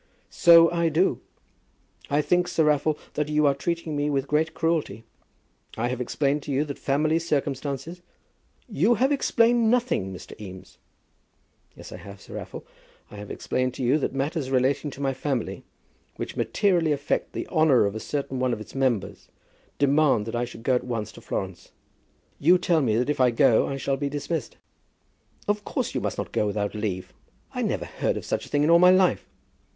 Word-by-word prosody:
"So 170 -1 +7
I 170 -1 +1
do. 165 +5 +1 0.9
I 145 +1 +2
think, 175 +4 +2
Sir 165 -2 +1
Raffle, 150 0 +2 0.2
that 150 0 -2
you 150 0 +2
are 140 - +4
treating 165 +2 -3
me 145 0 0
with 140 -1 -1
great 160 +2 0
cruelty. 160 -9 -1 0.7
I 120 +2 0
have 125 0 -3
explained 140 +3 0
to 145 - -6
you 140 +3 +1
that 140 -2 -7
family 155 +4 +1
circumstances 150 +1 -3 0.4
" - - -39 0.2
"You 235 +4 +5
have 260 +6 +2
explained 235 -4 +3
nothing, 240 - +1
Mr. 90 - -10
Eames." 95 -2 -11 1.0
"Yes, - - -11
I - - -7
have, 100 0 -11
Sir - - -13
Raffle. - - -7 0.5
I 105 - -10
have 105 0 -8
explained 130 0 -2
to - - -4
you 130 +5 +3
that - - -1
matters 140 +1 -2
relating 135 +3 +1
to 140 - -10
my 135 -1 0
family, 130 -3 -3 0.5
which - - -6
materially 175 -6 +1
affect 145 0 -2
the - - -4
honour 155 - +4
of 100 - -1
a 110 - -5
certain 135 0 -3
one 125 -1 +1
of 110 - -4
its 105 - -11
members, 130 -7 -1 0.5
demand 140 -5 +3
that 115 - -5
I 120 +1 0
should 115 -1 -11
go 130 - +2
at 125 - +1
once 115 -4 -4
to - - -14
Florence. 95 -2 -5 0.7
You 175 +5 +5
tell 170 -2 +2
me 115 -6 +1
that 125 +5 +1
if 145 - -1
I 125 - +5
go 115 -1 +3
I 135 - -3
shall 135 0 -1
be 140 0 -2
dismissed." 145 -2 -4 0.9
"Of 205 0 0
course - - -3
you - - -2
must - - -3
not - - -4
go 105 - 0
without 100 0 -2
leave. 105 -4 -4 0.4
I - - -3
never - - -1
heard - - -2
of - - -6
such - - -2
a - - -15
thing 145 0 +1
in 155 - +3
all 170 - +7
my 180 +1 +7
life." 185 -1 +3
140 Hz, 195 wpm, -25 LUFS, 125-160 Hz, 1.0 s, So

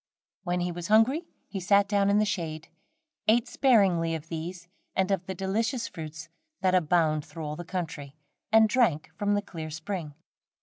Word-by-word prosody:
When 180 -2 -1
he 175 0 -1
was 175 0 -5
hungry, 255 +10 +3 0.2
he 195 - -5
sat 200 +2 +4
down 200 -1 +2
in 200 - +4
the 215 - +3
shade, 160 -5 -3 0.6
ate 225 +2 +4
sparingly 190 -10 +3
of 160 +1 -8
these 170 +2 -6 0.3
and 190 +1 +1
of 190 -2 -1
the 190 - -4
delicious 225 +6 -1
fruits 160 0 -8 0.3
that 185 -1 +2
abound 160 -3 +2
through 160 +1 -8
all 150 0 -4
the 175 - -6
country, 160 -6 -5 0.4
and 220 0 +7
drank 210 - +1
from 205 -1 +1
the 205 - 0
clear 160 -5 -7
spring. 160 -1 -5
180 Hz, 175 wpm, -28 LUFS, 165-205 Hz, 0.6 s, and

